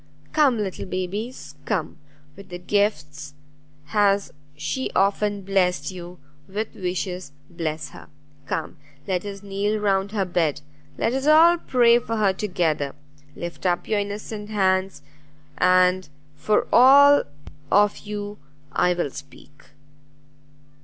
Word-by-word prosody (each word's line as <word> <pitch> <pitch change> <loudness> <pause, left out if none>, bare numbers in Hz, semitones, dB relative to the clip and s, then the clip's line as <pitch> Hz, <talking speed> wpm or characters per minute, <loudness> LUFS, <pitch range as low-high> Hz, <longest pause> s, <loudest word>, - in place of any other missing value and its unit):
Come, 280 -6 +4
little 195 -3 -4
babies, 195 +7 -5
come; 180 -7 -2 0.4
with 180 -2 -10
gifts 155 -9 -1 0.5
has 200 0 +2 0.2
she 260 - -3
often 200 +1 +1
blessed 190 -1 0
you, 180 -1 -9 0.3
with 210 +3 -4
wishes 180 -3 -4 0.2
bless 155 -3 -4
her! - - -13 0.4
Come, 165 +2 -4 0.3
let 185 0 -1
us 200 -1 -7
kneel 200 +2 -1
round 195 -1 0
her 200 -3 0
bed; 165 -5 0 0.4
let 230 - 0
us 270 +2 -1
all 330 +3 +6
pray 240 -4 +4
for 230 -1 -4
her 200 -3 +2
together; 165 -8 -1 0.4
lift 175 +2 -5
up 175 -1 0
your 215 -1 +1
innocent 205 +1 -5
hands, 190 -6 0 0.6
and 180 -1 +3 0.3
for 210 +8 +1
all 280 +3 +7 0.5
of 205 +1 +3
you 205 0 -6 0.3
I 180 +4 +2
will 175 -5 -2
speak." 145 +2 -13
195 Hz, 120 wpm, -23 LUFS, 180-210 Hz, 0.6 s, all